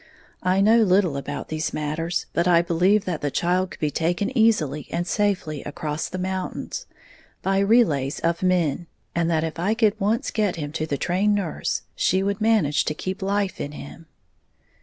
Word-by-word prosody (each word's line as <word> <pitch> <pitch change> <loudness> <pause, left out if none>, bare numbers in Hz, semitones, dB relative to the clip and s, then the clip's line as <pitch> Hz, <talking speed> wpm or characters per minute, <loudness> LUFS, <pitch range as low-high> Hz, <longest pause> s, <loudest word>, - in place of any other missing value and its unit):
I 185 +1 +2
know 220 +3 +5
little 185 -6 +3
about 140 -1 -5
these 155 0 -2
matters, 155 +3 -2
but 170 +1 +1
I 170 -1 +5
believed 180 +4 +2
that 175 -4 -3
the 145 - 0
child 180 +5 0
could - - -11
be 150 -1 0
taken 175 - -1
easily 160 - +2
and 175 +1 -2
safely 185 -8 -1
across 150 +1 -4
the 185 - -5
mountains, 185 0 -4 0.6
by 195 0 +2
relays 195 - +3
of 170 0 0
men, 175 -3 +1 0.3
and 170 -1 0
that 160 -1 +1
if 160 0 -4
I 200 +6 +1
could 220 -2 +2
once 215 +4 0
get 210 -4 0
him 145 -3 -5
to 155 0 -3
the 145 - -1
trained 195 +7 +1
nurse 190 -6 -2
she 190 +2 +2
would 200 +1 -1
manage 215 -10 +3
to 150 - -2
keep 185 +4 -5
life 200 0 -1
in 145 - -5
him. 160 +3 -10
180 Hz, 180 wpm, -24 LUFS, 155-200 Hz, 0.6 s, know